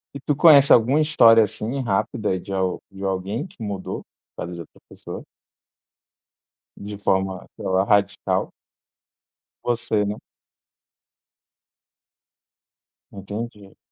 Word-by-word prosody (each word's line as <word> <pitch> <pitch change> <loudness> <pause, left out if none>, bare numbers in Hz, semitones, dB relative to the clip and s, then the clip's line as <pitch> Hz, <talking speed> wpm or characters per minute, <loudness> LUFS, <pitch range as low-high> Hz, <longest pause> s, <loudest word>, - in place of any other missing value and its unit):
E - - -5
tu 145 +1 -1
conhece 145 -3 +7
alguma 130 +6 +5
história 115 -7 +6
assim 115 +6 -3
rápida 105 -2 -1
de 95 +2 -8
al 95 -1 -1
de 95 0 -10
alguém 95 - -2
que 115 - -12
mudou 100 -3 -5 0.3
por - - -5
causa 90 - -7
de 85 - -8
outra 85 - -12
pessoa - - -9 1.5
de 100 0 -8
forma, 95 -2 -1
sei - - -8
lá, 95 +1 +2
radical? 100 -2 +1 1.1
Você, 115 -3 0
né? 105 +1 -3 3.0
Entendi. 100 0 -8
105 Hz, 110 wpm, -22 LUFS, 95-120 Hz, 3.0 s, conhece